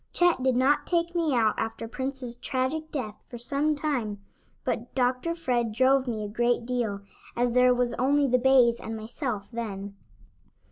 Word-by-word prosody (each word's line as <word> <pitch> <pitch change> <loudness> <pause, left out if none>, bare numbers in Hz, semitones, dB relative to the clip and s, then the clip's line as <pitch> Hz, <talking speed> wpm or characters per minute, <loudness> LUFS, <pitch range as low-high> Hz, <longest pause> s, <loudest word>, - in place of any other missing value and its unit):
Chet 350 -6 +3
did 260 -1 +2
not 265 +4 +2
take 340 -1 0
me 330 -6 +1
out 220 -3 +3
after 225 0 -3
Prince's 260 0 -4
tragic 270 +5 -2
death 230 -9 -5
for 240 - -7
some 285 +5 0
time, 255 -9 -2 0.4
but - - -3
Dr. 255 +6 +1
Fred 245 -8 0
drove 260 +3 +3
me 220 -3 -2
a - - -3
great 240 +2 0
deal, 235 -5 -2 0.3
as 245 0 +1
there 250 +1 +5
was 245 -1 +1
only 280 +2 +3
the 250 0 +3
bays 245 -2 +5
and 225 0 -5
myself 220 -1 -4
then. 200 -4 -5
250 Hz, 170 wpm, -27 LUFS, 230-275 Hz, 0.4 s, there